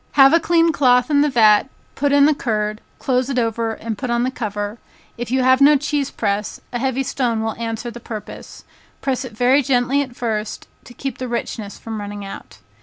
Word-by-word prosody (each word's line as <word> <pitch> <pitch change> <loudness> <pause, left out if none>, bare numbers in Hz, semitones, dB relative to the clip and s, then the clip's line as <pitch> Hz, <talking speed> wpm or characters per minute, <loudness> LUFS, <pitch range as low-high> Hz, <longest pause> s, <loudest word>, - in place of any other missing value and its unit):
Have 270 0 +7
a 335 - +6
clean 335 0 +3
cloth 250 -1 +3
in 285 -1 +4
the 295 - +3
vat, 220 -2 +4 0.2
put 285 0 0
in 285 0 +6
the 305 - +4
curd, 215 -5 -2 0.2
close 255 0 0
it 265 - -2
over 230 -1 0
and 220 -2 -5
put 255 - -3
on 235 0 +1
the 255 - 0
cover; 210 -2 -4 0.4
if 240 0 -5
you 260 +1 +1
have 260 +1 +4
no 295 +2 +7
cheese 285 0 -1
press, 205 -1 -2
a 240 - -1
heavy 265 +1 0
stone 240 -4 -1
will 220 0 -1
answer 230 +1 -4
the 240 - -9
purpose; 220 -2 -9 0.4
press 265 -1 -1
it 230 -4 -10
very 255 +4 +4
gently 260 +1 +1
at 255 -3 -6
first, 215 -3 -3 0.2
to 245 - -13
keep 270 -3 -5
the 255 - -3
richness 230 -3 -4
from 220 -2 -6
running 205 0 -6
out. 195 - -10
245 Hz, 210 wpm, -20 LUFS, 220-270 Hz, 0.4 s, Have